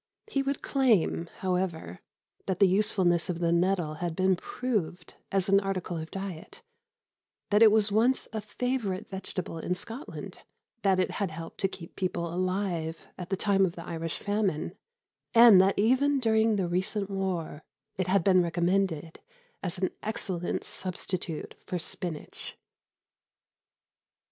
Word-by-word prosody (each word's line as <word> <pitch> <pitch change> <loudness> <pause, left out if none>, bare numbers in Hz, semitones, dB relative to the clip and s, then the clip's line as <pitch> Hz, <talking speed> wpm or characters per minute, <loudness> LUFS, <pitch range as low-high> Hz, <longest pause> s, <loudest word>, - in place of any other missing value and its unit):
He 275 -10 -1
would 275 0 -2
claim, 220 - +2
however, 180 - -2 0.5
that 190 - 0
the 200 - +6
usefulness 185 -3 +2
of 175 - -1
the 170 -1 +1
nettle 175 -2 +2
had 170 -2 -2
been 185 +1 +3
proved 185 -6 -3 0.2
as 195 -2 +1
an 195 0 +5
article 195 -3 -3
of 160 0 -5
diet, 195 - -7 0.9
that 210 +1 +4
it 220 -2 +9
was 215 -1 +3
once 235 +5 +2
a 220 - -2
favourite 215 -3 -2
vegetable 185 -3 -5
in 180 +3 -1
Scotland, 230 - -8 0.4
that 190 -2 +3
it 185 - +1
had 200 -3 -1
helped 165 +1 -8
to 195 - +2
keep 170 -3 -11
people 170 -3 -2
alive 180 -3 -2
at 180 -1 -7
the 195 - 0
time 195 -1 +3
of 180 -3 +1
the 170 - -8
Irish 165 -2 -4
famine, 205 -5 -1 0.6
and 230 -5 +9
that 195 +1 +2
even 260 +6 +3
during 220 -2 +3
the 190 -3 0
recent 190 +3 -1
war 185 -6 -3 0.3
it 185 -1 -1
had 190 -1 +3
been 185 -1 +5
recommended 175 -1 0 0.4
as 180 -2 -3
an 185 0 0
excellent 190 -5 -2
substitute 180 -3 -4
for 180 - -2
spinach. 170 -2 -5
185 Hz, 145 wpm, -29 LUFS, 170-205 Hz, 0.9 s, it